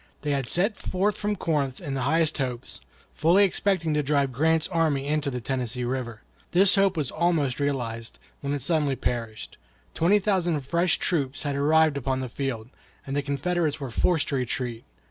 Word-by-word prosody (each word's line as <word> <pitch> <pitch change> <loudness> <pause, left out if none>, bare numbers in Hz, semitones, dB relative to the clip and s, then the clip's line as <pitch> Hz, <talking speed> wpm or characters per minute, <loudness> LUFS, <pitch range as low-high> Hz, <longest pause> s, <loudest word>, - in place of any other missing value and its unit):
They 145 - -1
had 135 -3 -1
set 195 - +1
forth 200 +3 -1
from 210 0 -2
Corinth 145 -7 -1
in 140 - -5
the 135 - -2
highest 160 +4 +1
hopes, 125 - -4 0.3
fully 170 +6 +4
expecting 185 -4 +1
to 150 - +2
drive 140 -1 +1
Grant's 160 +5 +2
army 160 -6 +1
into 150 0 0
the 125 -2 -4
Tennessee 125 0 -2
River. 120 -3 -3 0.3
This 190 +2 +7
hope 195 -3 +3
was 145 -4 -1
almost 155 -6 0
realized, 120 -5 -3 0.2
when 140 - -4
it 140 - -3
suddenly 145 -2 +2
perished: 115 -4 -4 0.3
twenty 180 +6 +3
thousand 185 -6 +1
fresh 170 +6 +1
troops 140 -6 -1
had 145 -2 -2
arrived 155 +1 +3
upon 130 -1 -1
the 130 -1 -4
field, 120 -3 -4 0.4
and 135 - -4
the 145 - +1
Confederates 150 +3 -1
were 135 -4 -5
forced 160 +4 +1
to 140 - 0
retreat. 120 -2 -3
145 Hz, 180 wpm, -26 LUFS, 130-165 Hz, 0.4 s, This